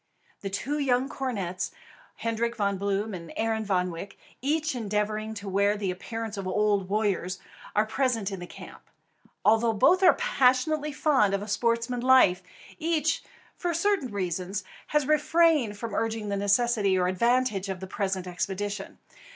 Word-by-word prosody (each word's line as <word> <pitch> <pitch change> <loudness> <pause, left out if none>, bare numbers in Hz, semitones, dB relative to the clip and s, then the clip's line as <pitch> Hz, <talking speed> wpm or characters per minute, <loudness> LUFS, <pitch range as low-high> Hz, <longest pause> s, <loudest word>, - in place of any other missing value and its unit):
The 195 - -4
two 280 +9 -2
young 260 -2 +2
cornets, 195 -10 -3 0.5
Hendrik 230 +1 -2
Von 200 -3 0
Bloom 200 +2 -1
and 170 -3 -7
Arend 220 -1 -1
Van 180 -2 +1
Wyk, 170 +4 -7 0.3
each 310 +3 0
endeavouring 215 -1 -2
to 200 -1 -7
wear 200 +2 +2
the 200 -3 -1
appearance 225 +3 -5
of 195 -1 -4
old 200 0 +1
warriors, 195 -3 0 0.4
are 210 +1 +4
present 225 -3 0
in 195 - -5
the 175 - -7
camp. - - -11 0.6
Although 225 +1 +4
both 360 - +4
are 365 -2 +7
passionately 300 - +2
fond 265 -10 +2
of 200 - -3
a - - -7
sportsman's 230 +3 0
life, 255 -9 +5 0.4
each, 325 0 +1 0.3
for 345 -2 -2
certain 360 -5 +1
reasons, 185 0 -3 0.2
had 300 -3 +1
refrained 305 -6 +3
from 225 -1 -5
urging 225 -1 -1
the 200 - 0
necessity 200 0 +2
or 180 0 +2
advantage 215 0 +1
of 190 -1 -3
the 190 - -6
present 190 -1 -2
expedition. 195 +3 -4
215 Hz, 155 wpm, -27 LUFS, 195-255 Hz, 0.6 s, are